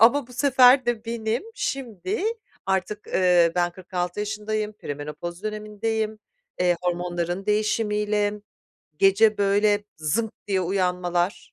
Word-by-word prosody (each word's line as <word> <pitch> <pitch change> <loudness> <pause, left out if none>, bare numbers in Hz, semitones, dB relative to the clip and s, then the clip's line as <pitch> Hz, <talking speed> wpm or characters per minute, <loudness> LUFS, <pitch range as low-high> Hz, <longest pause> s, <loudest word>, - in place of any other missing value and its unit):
ama 245 +4 +5
bu 250 - -15
sefer 255 -1 +5
de 240 -2 -1
benim 230 0 -2
şimdi 270 - -3 0.4
artık, 195 +2 -1
ııı, 175 -2 +4
ben 175 -1 +2
46 180 +1 -4
yaşındayım, 215 0 -2
perimenopoz 160 +2 -6
dönemindeyim, 215 +1 -3 0.4
eee, 180 -1 +3
hormonların 175 +1 -2
değişimiyle 210 -1 +1 0.7
gece 210 +3 +5
böyle 205 +1 +3
zınk 190 +9 -1
diye 195 -2 +1
uyanmalar, 180 0 -1
210 Hz, 110 wpm, -24 LUFS, 180-220 Hz, 0.7 s, ama